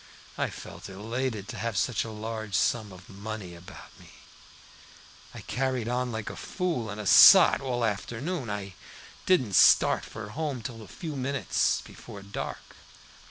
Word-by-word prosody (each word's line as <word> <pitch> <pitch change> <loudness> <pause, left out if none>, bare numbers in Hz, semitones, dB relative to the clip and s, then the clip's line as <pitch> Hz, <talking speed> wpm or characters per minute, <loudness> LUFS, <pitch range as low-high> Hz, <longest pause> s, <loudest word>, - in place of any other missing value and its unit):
I - - -1
felt - - -10
elated 110 +1 -4
at - - -7
having 115 -2 -2
such 125 0 +1
a 115 - -7
large 110 -1 -5
sum 110 0 +1
of 90 0 -13
money 100 -2 -7
about 90 +3 -12
me, - - -16 1.2
and - - -11
carried 130 -3 -1
on 125 +1 -1
like 110 -1 -4
a - - -9
fool 170 - -3
and 105 +1 -6
a 105 - -5
sot - - +8
all 125 -3 -1
afternoon. 120 - -3
I 100 -2 -5 0.5
didn't 130 - +3
start - - +5
for 105 -1 -8
home 140 -1 -4
till 115 -1 -7
a 110 - -11
few 155 - -7
minutes 135 +1 0
before 100 - -11
dark. 100 0 -7
110 Hz, 160 wpm, -28 LUFS, 100-130 Hz, 1.2 s, sot